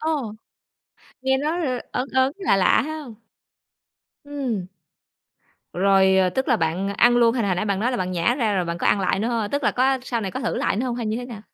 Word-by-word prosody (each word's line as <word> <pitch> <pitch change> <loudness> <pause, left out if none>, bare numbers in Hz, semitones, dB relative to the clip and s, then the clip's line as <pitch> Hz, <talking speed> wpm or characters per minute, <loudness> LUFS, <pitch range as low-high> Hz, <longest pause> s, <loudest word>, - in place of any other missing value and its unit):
Ồ, 295 -9 -2 0.9
nghe 265 0 +2
nó 305 +4 -1
l 260 -8 -1
ớn 255 +2 -2
ớn, 260 +1 +2
lạ 375 - +2
lạ 190 - +3
hông? 300 -6 -7 1.1
Ừm. 265 -10 -3 1.1
Rồi, 190 +1 +4
ờ, 185 -1 +3
tức 265 +8 -2
là 240 - +4
bạn 175 +2 -1
ăn 240 +4 +3
luôn, 235 -1 +4
hay 245 - 0
là 200 - 0
hồi 185 - +1
nãy 185 - -1
bạn 200 -2 -1
nói 240 +4 +1
là 250 - -2
bạn 185 -4 -2
nhả 175 +7 +1
ra 225 -6 0
rồi 185 -2 0
bạn 170 0 -4
có - - -1
ăn 200 - +3
lại 190 0 0
nữa 220 +4 -1
hông? 225 -4 -2
Tức 285 +1 -1
là - - +4
có 265 +1 +1
sau 240 -2 -2
này 195 -3 -3
có 260 - -5
thử 235 - -2
lại - - 0
nữa 245 +5 -1
hông, 240 -1 -2
hay 235 -2 -3
như 215 +1 -1
thế 245 - -5
nào? 230 -5 -9
235 Hz, 250 wpm, -23 LUFS, 195-260 Hz, 1.1 s, Rồi